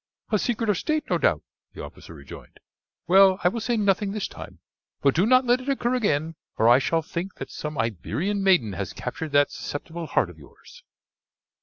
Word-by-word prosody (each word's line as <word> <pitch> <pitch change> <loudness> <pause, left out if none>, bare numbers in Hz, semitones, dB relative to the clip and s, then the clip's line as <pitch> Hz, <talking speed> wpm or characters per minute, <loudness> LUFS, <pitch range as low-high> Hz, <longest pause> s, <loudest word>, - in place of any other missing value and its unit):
"A 210 - +3
secret 230 0 -1
of 205 -4 +1
state, 310 -1 -1
no - - +2
doubt," - - +1 0.3
the - - -7
officer - - -11
rejoined. - - -13 0.5
"Well, 190 +1 +6
I 180 - +5
will 230 - -4
say 235 +1 -1
nothing 200 -1 +1
this 210 -2 -2
time; - - -11 0.5
but 140 -1 +4
do 185 +6 +2
not 255 +1 +5
let 245 +1 +2
it 265 - -6
occur 255 -3 0
again, 165 - 0 0.2
or 110 - +3
I 120 +2 +7
shall 165 +4 0
think 175 +5 -5
that - - -8
some 150 -1 -6
Iberian 145 - -2
maiden 180 - +3
has 95 0 -5
captured 150 +5 -5
that 145 0 +4
susceptible 165 +3 -6
heart - - +1
of - - -17
yours." 485 0 -17
190 Hz, 195 wpm, -25 LUFS, 145-225 Hz, 0.5 s, I